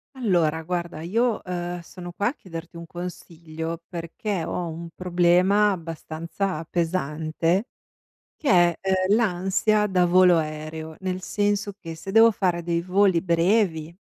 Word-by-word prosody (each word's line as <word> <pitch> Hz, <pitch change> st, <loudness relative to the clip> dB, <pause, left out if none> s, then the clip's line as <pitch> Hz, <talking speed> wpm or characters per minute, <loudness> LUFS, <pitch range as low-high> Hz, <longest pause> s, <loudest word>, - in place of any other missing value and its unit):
Allora 175 Hz, -10 st, +1 dB
guarda 175 Hz, -1 st, -3 dB
io, 225 Hz, +6 st, 0 dB
ehm, 175 Hz, -1 st, -4 dB
sono 175 Hz, +1 st, -9 dB
qua 200 Hz, +3 st, -1 dB
a 250 Hz, -, 0 dB
chiederti 170 Hz, -, -9 dB
un 170 Hz, 0 st, -8 dB
consiglio 165 Hz, -1 st, -7 dB
perché 175 Hz, +2 st, -4 dB
ho 175 Hz, +1 st, -3 dB
un 165 Hz, +1 st, -7 dB
problema 180 Hz, +3 st, +3 dB
abbastanza 165 Hz, 0 st, -4 dB
pesante 165 Hz, -, -1 dB, 0.7 s
che 300 Hz, -, -3 dB
è, 175 Hz, -7 st, +5 dB
ehm, 190 Hz, +1 st, +2 dB
l'ansia 210 Hz, +1 st, +2 dB
da 185 Hz, -3 st, +2 dB
volo 180 Hz, -1 st, +5 dB
aereo, 155 Hz, 0 st, -5 dB
nel 185 Hz, -1 st, -3 dB
senso 205 Hz, +1 st, -1 dB
che 165 Hz, -5 st, -7 dB
se 165 Hz, +4 st, -8 dB
devo 225 Hz, +3 st, +7 dB
fare 180 Hz, -5 st, 0 dB
dei 170 Hz, 0 st, 0 dB
voli 185 Hz, 0 st, +3 dB
brevi 170 Hz, -2 st, +1 dB
175 Hz, 135 wpm, -24 LUFS, 165-195 Hz, 0.7 s, devo